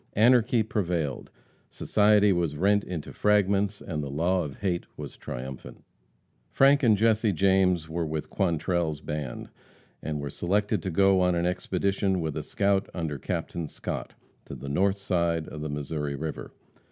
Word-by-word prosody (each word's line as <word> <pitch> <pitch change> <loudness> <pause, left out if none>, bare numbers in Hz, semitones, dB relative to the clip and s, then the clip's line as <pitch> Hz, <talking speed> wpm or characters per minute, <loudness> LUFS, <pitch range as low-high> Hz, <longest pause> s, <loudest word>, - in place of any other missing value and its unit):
Anarchy 120 +1 +4
prevailed. 85 - -2 0.4
Society 105 -1 +3
was 85 -4 -1
rent 100 +4 +3
into 85 -5 -6
fragments 100 -1 +2
and 80 -5 -4
the 70 - -5
law 85 +6 +1
of 70 -3 -7
hate 90 -4 -1
was - - -7
triumphant. 65 +1 -8 0.7
Frank 140 +1 +4
and 110 -6 +4
Jesse 110 0 +3
James 95 -2 +2
were 80 0 -2
with 75 0 -4
Quantrell's 85 -4 0
band, 75 -5 -5 0.5
and 75 -1 -3
were 70 -1 -5
selected 100 +4 0
to 95 - -3
go 95 +1 +4
on 90 -1 +2
an 85 0 0
expedition 95 +1 0
with 80 -3 -3
a - - -2
scout 100 -1 0
under 80 -5 -3
Captain 85 +5 -3
Scott, - - -6 0.3
to - - -8
the 70 - -7
north 95 +7 +2
side 85 -4 0
of 75 - -8
the 75 - -4
Missouri 75 0 -3
river. 75 +2 -5
90 Hz, 155 wpm, -27 LUFS, 75-100 Hz, 0.7 s, Anarchy